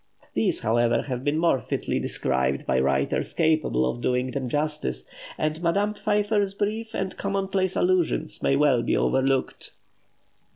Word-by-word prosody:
These, - - 0
however, 120 +1 +2
have 125 -2 -4
been 145 +2 0
more 160 -6 +2
fitly - - -2
described 65 +1 0
by 65 - +1
writers 65 0 0
capable 155 - +2
of 120 - -3
doing 125 +1 0
them 130 -2 -3
justice, 145 - -2 0.3
and 155 +1 -2
Madame 200 +5 +1
Pfeiffer's 205 -1 0
brief 220 +2 -2
and 190 -1 -3
commonplace 195 -1 -1
allusions 180 -3 0
may 135 - +2
well 140 -4 +3
be - - 0
overlooked. 135 0 0
150 Hz, 140 wpm, -25 LUFS, 120-190 Hz, 0.3 s, well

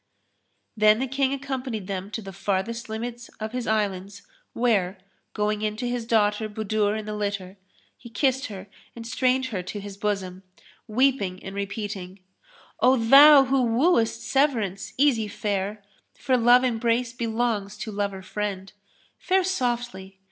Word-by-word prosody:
Then 215 0 +5
the 260 - -1
King 270 +1 0
accompanied 265 -6 -4
them 190 0 -5
to 220 +1 -5
the 195 0 -9
farthest 205 +5 -2
limits 235 +2 -5
of 220 0 -4
his 250 -1 -4
Islands 200 -2 -2 0.3
where, 205 -6 +1 0.4
going 210 0 -1
in 215 0 -2
to 245 - -3
his 240 -2 -3
daughter 215 -1 +2
Budur 215 0 -1
in 215 - -6
the 215 - -4
litter, 200 -2 -4 0.4
he 235 - -12
kissed 265 +4 0
her 195 -4 -8 0.3
and 230 -1 -8
strained 255 +2 +1
her 185 - -1
to 185 +3 -6
his 200 -1 -9
bosom, 195 -3 -3 0.5
weeping 220 -6 +1
and 190 - -7
repeating, 200 -1 -5 0.6
"O 260 +1 +5
thou 275 +5 +8
who 265 0 +2
wooest 230 -2 +2
Severance, 230 -9 0
easy 255 -6 +3
fare! 205 0 -3 0.2
* - - -38
For 260 - +1
love 245 +1 +5
embrace 235 0 0
belongs 225 -4 -2
to 215 +1 -5
lover 200 -2 -3
friend: 195 0 -4 0.5
Fare 380 0 +2
softly! 240 - -2
220 Hz, 150 wpm, -25 LUFS, 200-245 Hz, 0.6 s, thou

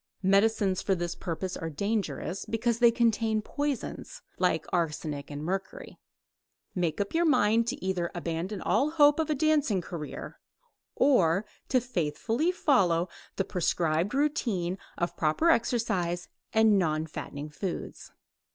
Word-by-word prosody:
Medicines 195 -1 +3
for 195 - +1
this 175 -1 -3
purpose 180 +1 -4
are 165 - -4
dangerous, 190 -1 -2
because 225 +1 0
they 240 -1 +7
contain 225 -2 +2
poisons, 290 - -4 0.2
like 170 -4 +1
arsenic 150 -4 -2
and 145 0 -6
mercury. 190 +3 -5 0.7
Make 175 -2 -1
up 200 - -2
your 335 +1 +3
mind 230 -7 +3
to 260 -5 -3
either 180 -2 -1
abandon 175 +4 -3
all 270 +8 +2
hope 295 -1 +5
of 320 -1 0
a 305 - +2
dancing 295 -8 +2
career, 165 -3 -7 0.6
or 195 - +3 0.2
to 255 - +4
faithfully 230 - -1
follow 185 - +2 0.3
the 195 - 0
prescribed 170 +2 0
routine 225 - 0 0.2
of 170 - -2
proper 165 - +3
exercise 185 - 0 0.2
and 220 -2 +5
non 155 -3 0
fattening 150 -1 -7
foods. 180 +4 -5
195 Hz, 135 wpm, -28 LUFS, 170-235 Hz, 0.7 s, they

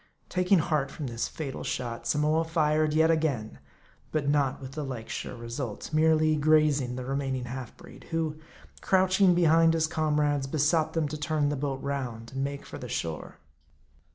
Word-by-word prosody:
Taking 180 +1 +3
heart 150 -4 0
from 145 +1 -6
this 120 -2 -2
fatal 140 -4 -6
shot, 115 -1 -4
Samoa 150 +5 +2
fired 155 -2 +1
yet 160 +1 +5
again; 145 -9 -1 0.5
but 150 -2 -1
not 140 -2 +1
with 135 -1 -8
the 150 +2 -4
like 125 -5 -6
sure - - -5
result; 115 +2 -6
merely 155 0 +4
grazing 150 -4 +3
the 125 0 -5
re 135 +1 -2
maining 135 -2 -2
half 125 0 -7
breed, 175 - -14
who, 160 -2 -2 0.4
crouching 190 -1 +4
behind 165 -1 +5
his 160 -1 +2
comrades, 150 -3 0
besought 155 +2 +1
them 160 -2 0
to 150 +1 -6
turn 150 -1 0
the 145 - -1
boat 135 -1 -3
round, 125 -5 -4
and 135 0 -2
make 140 0 -4
for - - -8
the - - -7
shore. 80 -2 -4
150 Hz, 175 wpm, -28 LUFS, 135-160 Hz, 0.5 s, yet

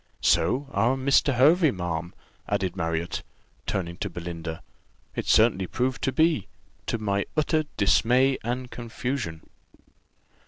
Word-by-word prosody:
So 140 +2 +2
our 115 +6 +2
Mr. 140 0 +3
Hervey, 155 +6 +5
ma'am," 85 - -4 0.3
added 95 -2 -1
Marriott, 85 0 -2 0.5
turning 85 -3 -2
to 100 - -3
Belinda, 85 -1 -6 0.5
"it - - -3
certainly 110 -4 +4
proved 125 +3 -1
to 135 - +1
be, 160 - +2 0.4
to - - 0
my 100 -2 -1
utter 155 0 +2
dismay 125 +6 +3
and 125 +2 -3
confusion." 120 - -4
115 Hz, 120 wpm, -26 LUFS, 90-130 Hz, 0.5 s, Hervey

